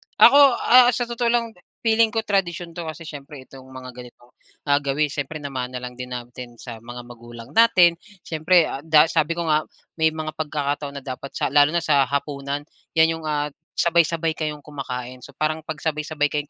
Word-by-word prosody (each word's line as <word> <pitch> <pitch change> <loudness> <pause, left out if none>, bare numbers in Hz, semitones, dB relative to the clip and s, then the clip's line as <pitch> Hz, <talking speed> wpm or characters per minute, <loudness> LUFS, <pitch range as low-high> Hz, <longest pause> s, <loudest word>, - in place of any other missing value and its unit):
Ako, 275 +4 +7 0.3
ah, 250 0 +7
sa 245 - -1
totoo 235 0 -2
lang 235 -1 +1
de 180 - -24 0.2
feeling 225 -1 +3
ko 225 - -1
tradisyon 175 -4 -1
'to 170 - -5
kasi 160 +2 -8
siyempre 140 -2 -10
itong 135 -1 -13
mga 130 -1 -10
ganitong, 125 0 -14 0.4
ah, 145 0 +4
gawi 145 +1 0
siyempre 150 +2 -4
namana 130 -2 -4
lang 125 0 -6
din 125 0 -6
natin 120 0 -9
sa 115 -1 -9
mga 120 +1 -9
magulang 120 +1 -12
natin. 180 -6 +5 0.2
Siyempre, 165 +2 +3
ah, 135 - -5
da 155 0 +5
sabi 160 0 +1
ko 170 - -2
nga 155 -1 +1 0.3
may 160 0 +4
mga 155 -1 -4
pagkakataon 145 -2 -3
na - - -20
dapat 130 +1 -7
sa - - -1
lalo 145 0 +5
na 170 - +1
sa 140 -4 +3
hapunan, 140 0 -3 0.3
yan 160 0 +5
'yong, 160 - -10
ah, 150 -1 -1 0.3
sabay-sabay 165 -1 +2
kayong 150 -2 -5
kumakain. 125 -3 -7
So, 140 - -14
parang 155 +1 -1
pag 160 0 -6
sabay-sabay 150 -1 -2
kayong 150 0 -2
150 Hz, 195 wpm, -22 LUFS, 135-165 Hz, 0.4 s, Ako